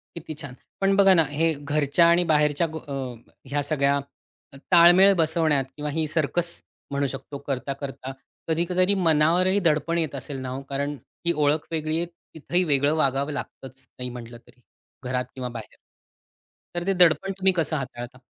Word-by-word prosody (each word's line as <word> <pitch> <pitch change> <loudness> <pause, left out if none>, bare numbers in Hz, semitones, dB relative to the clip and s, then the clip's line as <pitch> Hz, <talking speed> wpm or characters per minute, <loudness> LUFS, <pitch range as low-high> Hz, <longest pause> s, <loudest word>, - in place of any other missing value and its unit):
किती 160 -1 -7
छान. 140 -3 -8 0.3
पण 195 0 +3
बघा 195 -1 +6
ना, 165 -2 +5
हे 160 +2 +1
घरच्या 145 +3 +2
आणि 175 +1 +4
बाहेरच्या 150 +2 +2 0.2
अ, 140 - -5 0.6
ह्या 145 0 0
सगळ्या 140 -1 +1 0.6
अ, - - -11
ताळमेळ 180 +3 +7
बसवण्यात 155 -4 +2
किंवा 150 0 -4
ही 160 +1 0
सर्कस 165 +2 -1 0.3
म्हणू 140 0 0
शकतो, 140 +2 -7
करता-करता 135 0 -4 0.4
कधीतरी 180 +4 +1
मनावरही 175 +6 +3
दडपण 155 +2 +1
येत 155 -4 -1
असेल 135 +1 -6
ना 130 - -5
हो. 130 +2 -5
कारण 140 +1 -2 0.3
ही 170 - +2
ओळख 150 +1 +1
वेगळी 155 0 -1
आहे. 170 - 0 0.3
तिथेही 175 +3 0
वेगळं 145 -1 +2
वागावं 140 0 +1
लागतंच, 135 -1 -8
नाही 125 0 -3
म्हटलं 120 -1 -9
तरी. 125 - -22 0.4
घरात 125 0 -2
किंवा 125 -1 -4
बाहेर. 110 -2 -9 1.0
तर 175 0 -3
ते 195 - +3
दडपण 180 +2 +4
तुम्ही 190 0 +4
कसं 165 -2 -1
हाताळता? 130 -1 -7
150 Hz, 160 wpm, -24 LUFS, 140-170 Hz, 1.0 s, ताळमेळ